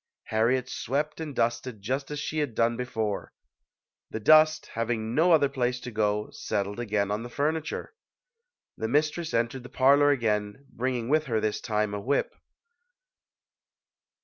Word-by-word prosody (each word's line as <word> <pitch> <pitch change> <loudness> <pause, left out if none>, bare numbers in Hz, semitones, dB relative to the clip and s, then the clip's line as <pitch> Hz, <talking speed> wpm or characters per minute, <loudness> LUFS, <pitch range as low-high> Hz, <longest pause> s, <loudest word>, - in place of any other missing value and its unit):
Har 110 +1 +3
riet 130 0 +1
swept 150 +5 -2
and 155 -4 -5
dusted 120 -1 -1
just 130 +7 -3
as 150 -1 -4
she 155 +2 -2
had 140 -7 -2
done 115 0 +2
before. 110 -4 -3 0.8
The 110 - -4
dust, 155 +6 +5
having 115 -1 -2
no 165 +6 +4
other 150 -4 +5
place 125 -2 -1
to 125 - -7
go, 105 -1 0
settled 100 0 -3
again 105 -3 0
on 105 +2 -1
the 120 - -7
furniture. 155 - -2 0.8
The 110 - -2
mistress 155 +5 0
en 115 0 +2
tered 130 +1 -8
the 125 - -11
parlor 140 +2 +5
again, 110 -2 0
bringing 125 -2 -2
with 155 +3 +2
her 115 -5 0
this 110 -1 -1
time 105 -2 -1
a 100 - -3
whip. 140 +6 0
120 Hz, 160 wpm, -27 LUFS, 110-145 Hz, 0.8 s, dust